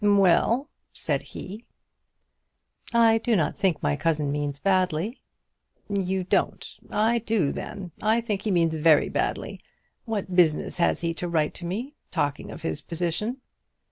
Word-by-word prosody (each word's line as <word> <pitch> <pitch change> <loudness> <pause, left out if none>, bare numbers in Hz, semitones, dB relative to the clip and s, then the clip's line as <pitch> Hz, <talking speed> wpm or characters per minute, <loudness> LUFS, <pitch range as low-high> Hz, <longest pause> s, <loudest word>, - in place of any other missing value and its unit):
"Well," 205 - +4 0.2
said - - -1
he. 210 +5 -8 1.3
"I 230 -1 +5
do 230 0 +1
not 160 -6 +1
think 190 -5 0
my 75 - +2
cousin 150 - 0
means 145 -1 -2
badly." 185 - 0 0.7
"You 190 -2 0
don't! 180 - 0 0.2
I 225 +3 +2
do, 215 -10 +1
then. 185 -3 -6
I 220 +2 +3
think 215 -4 -2
he 215 - -2
means 170 -4 +2
very 155 -1 +4
badly. - - -2 0.4
What 205 -5 -3
business 170 0 +3
has 170 - +2
he 170 -1 0
to 175 +2 -4
write 155 -3 +1
to 175 - -6
me, 235 +11 -4 0.2
talking 145 -1 -2
of - - -9
his 80 - -2
position?" 180 +9 -2
185 Hz, 145 wpm, -26 LUFS, 165-220 Hz, 1.3 s, I